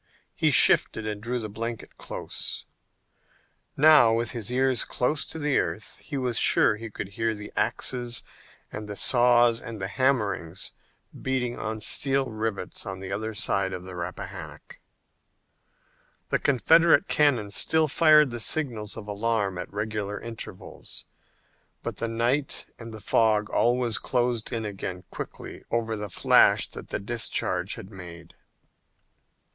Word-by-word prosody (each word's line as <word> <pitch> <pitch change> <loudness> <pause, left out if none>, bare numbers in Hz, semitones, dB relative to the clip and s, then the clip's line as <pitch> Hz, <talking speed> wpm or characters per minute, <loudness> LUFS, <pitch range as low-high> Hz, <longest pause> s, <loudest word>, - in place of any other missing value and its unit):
He - - +2
shivered 110 - +5
and 105 -1 -4
drew 120 +3 -2
the 110 -3 -4
blanket 115 +2 -6
close. - - -5 1.1
Now, 150 -6 +7
with 115 +1 0
his 120 -2 -3
ears 130 0 +2
close 140 +4 -1
to - - -7
the 150 -3 +1
earth, 110 - -4
he 145 - -6
was 125 -3 0
sure - - +5
that 105 - -9
he 115 - -5
could 100 -2 -6
hear 115 +2 -1
the 105 0 -9
axes 120 -2 -1 0.5
and 105 0 -7
the 105 - -5
saws 120 0 +4
and 115 -2 -8
the 95 - -3
hammers 100 -7 -1 0.5
beating 125 -2 -1
on 110 0 -4
steel 135 +2 +2
rivets 110 -4 -3
on 95 -1 -6
the 95 0 -7
other 110 +2 -3
side 100 -1 0
of 90 - -6
the 95 0 -9
Rappahannock. 90 -3 -8 1.5
The - - +1
Confederate 165 +7 +4
cannon 125 -9 +2
still 155 +10 +3
fired 150 -1 +5
the 120 - -4
signals 115 -5 -2
of 110 -2 -8
alarm 105 -3 -1
at - - -6
regular 105 -1 -3
intervals, 115 -1 -9 0.8
but - - -5
the 115 - -2
night 120 +5 -1
and 115 -1 -9
the 110 -1 -9
fog 105 -1 +2
always 120 -1 +1
closed 120 -3 -1
in 115 -3 -3
again 95 -3 -5
quickly - - -8
over 115 -1 -1
the 105 -1 -5
flash - - +4
that - - -9
the - - -2
discharge 115 +3 -1
had 95 - -10
made. 85 -4 -11
115 Hz, 145 wpm, -26 LUFS, 105-125 Hz, 1.5 s, Now